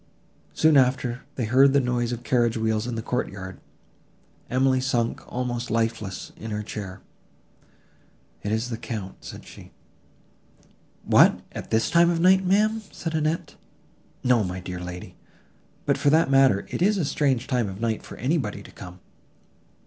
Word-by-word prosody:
Soon 155 -2 +5
after, 125 -1 +2
they 120 - -1
heard 135 +4 +5
the 140 - +5
noise 125 -2 0
of 120 0 -5
carriage 120 -2 +1
wheels 110 0 0
in 120 - -3
the 115 - -4
courtyard. 95 -7 -4 0.9
Emily 130 0 +2
sunk 120 -3 0
almost 120 -1 -3
lifeless 115 -3 -2
in 110 - -7
her 105 0 -3
chair; 100 -3 -7 1.4
"It 105 - -3
is 110 +3 -1
the 115 - -4
Count," 110 -5 -6
said - - -9
she. - - -13 1.3
"What, - - +5
at - - -7
this 110 +1 +1
time 170 0 +5
of 170 -1 0
night, 190 +2 +5
ma'am!" 215 +4 +2
said 165 -1 -5
Annette: 155 +1 -1 0.7
"no, 125 -3 +3
my 90 -1 -4
dear 90 0 -6
lady. 90 0 -8 0.7
But, - - +1
for 145 - +3
that 155 -2 +3
matter, 135 -7 +4
it - - -4
is 205 +3 +3
a 175 - 0
strange 135 -4 +1
time 120 -5 0
of 95 +1 -8
night 115 -1 -1
for - - -11
anybody 130 - -1
to - - -13
come!" 90 0 -11
120 Hz, 160 wpm, -25 LUFS, 110-140 Hz, 1.4 s, Soon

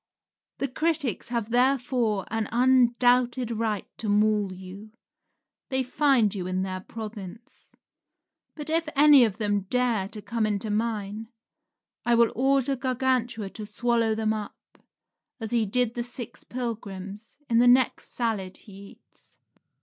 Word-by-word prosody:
The 275 - -1
critics 300 -3 -1
have 235 -2 -2
therefore 245 -5 +1
an 225 -1 -1
undoubted 245 0 +3
right 220 -3 -1
to 215 - -3
maul 210 -1 +2
you; 190 +3 -10 0.8
they 265 0 0
find 255 -5 +2
you 185 -3 -4
in 185 0 -1
their 185 -1 -4
province. 215 0 -10 0.8
But 305 0 -5
if 325 -1 +1
any 290 -2 +7
of 215 -3 -3
them 205 -3 -1
dare 240 -6 +1
to 210 - -7
come 215 +2 -1
into 210 0 -2
mine, 215 -1 -2 0.8
I 240 0 +3
will 235 -1 +4
order 270 +1 +2
Gargantua 250 -5 -1
to 215 -1 -8
swallow 230 -1 +1
them 220 0 0
up, 210 -2 -6 0.8
as 225 -2 -5
he 230 -3 +1
did 245 +2 +1
the 240 - -3
six 245 -1 -6
pilgrims, 210 -4 -6
in 230 0 +3
the 245 - +5
next 250 +1 +3
salad 210 -6 -2
he 205 - -15 0.2
eats. - - -29
230 Hz, 140 wpm, -26 LUFS, 210-250 Hz, 0.8 s, any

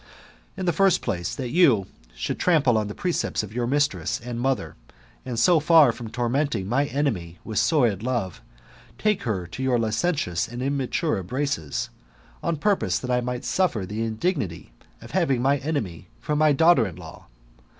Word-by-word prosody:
In 190 - -3
the 175 - +2
first 195 +1 +3
place, 90 -7 -2
that 125 -4 -4
you 135 - +4 0.3
should - - -3
trample 150 -9 +3
on 105 -1 +1
the 105 - -7
precepts 175 -10 -1
of 105 0 -9
your 120 0 -1
mistress 145 +2 0
and 120 0 -6
mother, 135 +1 -1 0.5
and 120 -2 -3
so 170 +6 +5
far 155 -3 +6
from 115 -1 -8
tormenting 120 -3 -1
my 135 +6 +2
enemy 115 - -2
with 110 -2 -2
sordid 120 - +2
love, 115 -8 -2 0.6
take 210 -2 +1
her 95 -5 -1
to 90 +9 -8
your 130 -2 +2
licentious 115 - 0
and 120 +2 -6
immature 140 - -1
embraces, 95 - -3 0.5
on 170 -2 -1
purpose 140 - +1
that 125 +7 -4
I 125 0 +2
might 125 +1 -4
suffer 155 - 0
the 105 +4 -4
indignity 110 - -2 0.3
of - - -11
having 135 -3 +1
my 135 +3 +3
enemy 125 - -4
for 150 - -2
my 155 0 +4
daughter 145 -5 +5
in 90 - -8
law. - - -12
125 Hz, 170 wpm, -24 LUFS, 110-150 Hz, 0.6 s, far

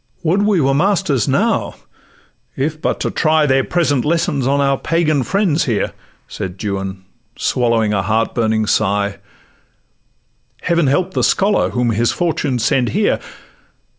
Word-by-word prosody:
'Would 175 +5 +2
we 205 -4 +2
were 135 -2 +2
masters 170 - +1
now, - - 0 0.8
if 155 +3 -3
but - - -1
to - - -1
try 155 -1 +2
Their 135 -1 +2
present 145 -6 0
lessons 150 -4 0
on 140 +1 +2
our 140 -1 +2
Pagan 155 -1 0
friends 185 - 0
here,' 115 -7 -1 0.3
Said 90 0 -6
Juan,—swallowing 100 +3 -2
a 100 - +1
heart 110 +3 0
burning 110 -2 0
sigh: 100 -1 0 1.4
'Heaven 170 -3 +1
help 180 +7 0
the - - 0
scholar 200 +1 +2
whom 120 -1 0
his 115 +2 +1
fortune 155 -6 -1
sends 120 +1 +1
here! 210 +1 +1
135 Hz, 135 wpm, -17 LUFS, 110-165 Hz, 1.4 s, Would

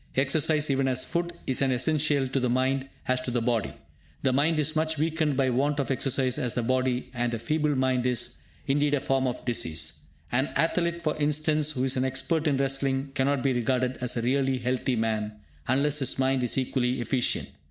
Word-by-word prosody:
Exercise, 145 +2 +2
even 135 0 +1
as 130 0 +1
food, 170 0 -2
is 130 - 0
as 135 - +3
essential 145 +1 +1
to 130 +1 -1
the 125 -1 0
mind 130 +2 0 0.2
as 130 0 +1
to 130 - -2
the 120 0 0
body. 115 -2 0 0.5
The 130 -2 +2
mind 155 +4 +2
is 155 +1 0
much 160 0 0
weakened 155 -2 0
by 130 -2 +2
want 145 +4 +1
of 140 - -1
exercise 130 -1 +1
as 120 -2 -1
the 120 - 0
body, 130 0 0
and 120 -1 -1
a - - -3
feeble 150 +5 0
mind 130 -1 +1
is, 125 -2 -2 0.3
indeed, 145 +1 +2
a - - 0
form 135 0 0
of 125 - -4
disease. 85 -10 -1 0.3
An 130 +4 +1
athlete, 170 +1 0
for 155 - 0
instance, 150 0 +1
who 130 -2 -1
is 135 0 0
an 130 - +1
expert 155 +5 0
in 140 -3 +2
wrestling, 135 0 -1
cannot 135 0 +1
be 135 -2 +2
regarded 125 +1 0
as 125 -1 -1
a 115 - -1
really 135 +1 +1
healthy 125 +1 -1
man, 110 -1 -1 0.3
unless 145 +3 +2
his 135 - 0
mind 130 0 +1
is 125 +1 0
equally 130 -1 0
efficient. 120 +1 0
135 Hz, 205 wpm, -27 LUFS, 125-145 Hz, 0.5 s, as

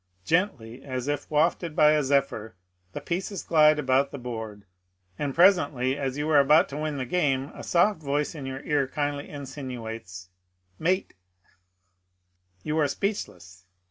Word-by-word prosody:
I 90 0 -43
Gently 135 - -1
as 130 -1 -5
if 145 0 -3
wafted 160 +1 +1
by 150 0 +6
a 155 0 +3
zephyr 135 -7 0 0.4
the - - -5
pieces 185 +2 -3
glide 155 -1 +5
about 135 -1 +2
the - - -7
board; 110 -5 -7 0.5
and 140 -2 -2
presently 145 -8 +4
as 135 -1 -3
you 150 +1 -2
are 150 - +6
about 150 +3 +5
to 140 - -6
win 155 -1 -3
the 130 - -3
game 140 -3 0
a - - -9
soft 175 +1 +2
voice 145 0 -1
in 145 -4 -7
your 135 +1 -5
ear 145 -3 +1
kindly 145 +1 -3
insinuates, 120 -9 -7 0.5
Mate 185 +4 0 0.3
I - - -34 1.1
You 155 +1 -1
are 150 - +3
speechless. 100 - -4
140 Hz, 160 wpm, -26 LUFS, 130-155 Hz, 1.1 s, by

